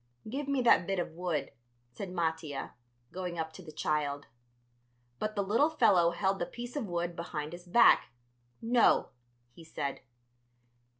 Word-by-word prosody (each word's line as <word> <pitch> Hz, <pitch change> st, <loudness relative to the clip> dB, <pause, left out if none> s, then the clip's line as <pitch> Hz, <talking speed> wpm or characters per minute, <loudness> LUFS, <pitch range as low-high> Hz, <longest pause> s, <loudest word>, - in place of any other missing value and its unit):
"Give 275 Hz, +5 st, -4 dB
me 275 Hz, -2 st, +1 dB
that 205 Hz, -7 st, +5 dB
bit 195 Hz, -, 0 dB
of 175 Hz, -2 st, -2 dB
wood," 160 Hz, -4 st, -3 dB, 0.4 s
said 185 Hz, +10 st, -6 dB
Mattia, 160 Hz, -5 st, -3 dB, 0.4 s
going 180 Hz, -2 st, -5 dB
up 160 Hz, -1 st, -3 dB
to 185 Hz, -, -10 dB
the 165 Hz, -3 st, -10 dB
child. 145 Hz, -2 st, -1 dB, 0.9 s
But 215 Hz, 0 st, -2 dB
the 200 Hz, -, +1 dB
little 230 Hz, +10 st, +3 dB
fellow 205 Hz, -, +4 dB
held 190 Hz, +3 st, 0 dB
the 175 Hz, -, -2 dB
piece 240 Hz, 0 st, -8 dB
of 270 Hz, -7 st, -2 dB
wood 175 Hz, -1 st, -2 dB
behind 160 Hz, -2 st, -5 dB
his 175 Hz, +1 st, -10 dB
back. 235 Hz, +6 st, +6 dB, 0.5 s
"No," 235 Hz, +1 st, +4 dB, 0.4 s
he 165 Hz, -, -14 dB
said. 140 Hz, -3 st, -4 dB
175 Hz, 155 wpm, -31 LUFS, 160-215 Hz, 0.9 s, back